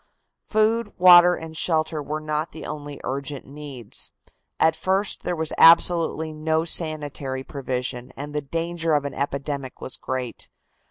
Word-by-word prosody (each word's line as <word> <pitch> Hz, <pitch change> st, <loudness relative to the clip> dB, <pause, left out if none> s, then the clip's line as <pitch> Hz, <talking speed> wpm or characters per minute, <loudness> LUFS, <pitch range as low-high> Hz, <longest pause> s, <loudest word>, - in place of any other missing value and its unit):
Food, 215 Hz, 0 st, +1 dB
water 180 Hz, -1 st, +8 dB
and 160 Hz, -1 st, -9 dB
shelter 160 Hz, -1 st, 0 dB
were 150 Hz, +2 st, -4 dB
not 155 Hz, +1 st, -3 dB
the 160 Hz, -, -8 dB
only 145 Hz, -1 st, -6 dB
urgent 140 Hz, +1 st, -4 dB
needs. 140 Hz, -5 st, -6 dB, 0.5 s
At 160 Hz, 0 st, +4 dB
first 190 Hz, +2 st, 0 dB
there 175 Hz, -, -2 dB
was 160 Hz, -1 st, -3 dB
absolutely 165 Hz, -1 st, +5 dB
no 160 Hz, +1 st, 0 dB
sanitary 145 Hz, -5 st, -1 dB
provision, 125 Hz, -2 st, -4 dB
and 145 Hz, +2 st, -6 dB
the 150 Hz, -, -1 dB
danger 165 Hz, +2 st, -2 dB
of 145 Hz, -1 st, 0 dB
an 140 Hz, -, -4 dB
epidemic 140 Hz, -1 st, -4 dB
was 130 Hz, -, -6 dB
great. 130 Hz, -2 st, -5 dB
155 Hz, 145 wpm, -24 LUFS, 140-165 Hz, 0.5 s, water